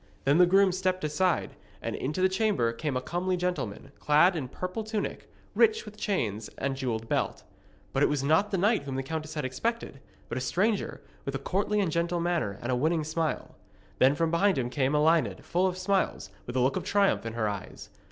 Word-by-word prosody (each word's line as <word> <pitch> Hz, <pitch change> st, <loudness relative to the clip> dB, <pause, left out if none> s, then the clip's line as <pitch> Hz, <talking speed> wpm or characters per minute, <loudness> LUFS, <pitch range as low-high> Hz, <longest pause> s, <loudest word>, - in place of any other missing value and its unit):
Then 145 Hz, +4 st, +3 dB
the 180 Hz, -, +7 dB
groom 195 Hz, +1 st, +5 dB
stepped 185 Hz, 0 st, -1 dB
aside, 160 Hz, +4 st, 0 dB, 0.2 s
and -, -, -4 dB
into 150 Hz, +8 st, -2 dB
the -, -, +7 dB
chamber 190 Hz, -, +1 dB
came 135 Hz, +2 st, -2 dB
a -, -, -2 dB
comely 180 Hz, +5 st, -1 dB
gentleman, 175 Hz, -, -3 dB
clad 155 Hz, +5 st, +4 dB
in 145 Hz, -6 st, -3 dB
purple 185 Hz, -, -4 dB
tunic, 215 Hz, -1 st, -4 dB, 0.2 s
rich 445 Hz, 0 st, +3 dB
with 210 Hz, -, -10 dB
chains 115 Hz, -, -2 dB
and 135 Hz, 0 st, -1 dB
jewelled 115 Hz, -4 st, -3 dB
belt. -, -, -1 dB, 0.5 s
But -, -, +1 dB
it -, -, +5 dB
was 145 Hz, -2 st, 0 dB
not 160 Hz, +8 st, +3 dB
the 195 Hz, -, 0 dB
knight 210 Hz, +5 st, +3 dB
whom 135 Hz, -2 st, -4 dB
the 135 Hz, -, -2 dB
countess 155 Hz, +2 st, -5 dB
had 150 Hz, -3 st, -2 dB
expected, 185 Hz, -, -3 dB, 0.3 s
but 120 Hz, -, -3 dB
a -, -, -5 dB
stranger, 195 Hz, -, 0 dB, 0.2 s
with 140 Hz, -, -4 dB
a -, -, +1 dB
courtly 200 Hz, +8 st, 0 dB
and 190 Hz, -5 st, +1 dB
gentle 170 Hz, +1 st, 0 dB
manner 170 Hz, -, -1 dB
and 120 Hz, -, -1 dB
a -, -, +2 dB
winning 155 Hz, +5 st, +1 dB
smile. 160 Hz, +1 st, -2 dB, 0.5 s
Then 135 Hz, +2 st, +5 dB
from 165 Hz, +1 st, 0 dB
behind 190 Hz, +1 st, +3 dB
him 125 Hz, -2 st, -1 dB
came 135 Hz, +1 st, +1 dB
Elined, 150 Hz, -, +2 dB
full 180 Hz, +2 st, +2 dB
of 185 Hz, -1 st, -3 dB
smiles, 190 Hz, +1 st, 0 dB, 0.2 s
with 120 Hz, -, -5 dB
a -, -, +2 dB
look 130 Hz, +2 st, +2 dB
of -, -, -3 dB
triumph 200 Hz, -1 st, +2 dB
in 115 Hz, 0 st, -5 dB
her 110 Hz, -2 st, 0 dB
eyes. 100 Hz, -2 st, -6 dB
160 Hz, 210 wpm, -28 LUFS, 130-185 Hz, 0.5 s, the